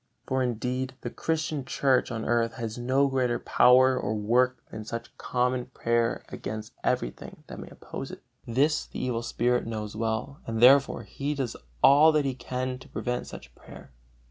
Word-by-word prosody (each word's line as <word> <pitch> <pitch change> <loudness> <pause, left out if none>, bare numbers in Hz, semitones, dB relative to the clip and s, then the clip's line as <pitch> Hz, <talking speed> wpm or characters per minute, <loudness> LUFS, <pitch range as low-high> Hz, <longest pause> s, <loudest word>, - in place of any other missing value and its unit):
For, 130 0 0
indeed, 125 +2 -2
the 120 - -5
Christian 155 -3 -2
Church 130 0 +1
on 110 -1 -4
earth 115 0 +1
has 115 -1 -5
no 130 +3 +2
greater 130 -3 0
power 130 +1 +5
or 110 -3 -2
work 125 +4 +2
than 110 - -6
such 115 +2 -7
common 125 0 0
prayer 115 -2 0
against 110 +1 -6
everything - - -3
that - - -9
may - - -9
oppose - - -8
it. - - -10 0.2
This 140 +6 +1
the - - -9
evil 125 -2 -1
spirit 120 0 0
knows 105 -2 -5
well, 115 +5 -2
and 115 -1 -2
therefore 135 +3 +5
he 145 +2 -4
does 130 -5 -3 0.3
all 150 +3 +8
that 150 -2 +2
he 135 - 0
can 130 0 -4
to - - -15
prevent 125 0 -3
such - - -11
prayer. - - -14
125 Hz, 170 wpm, -27 LUFS, 115-130 Hz, 0.3 s, all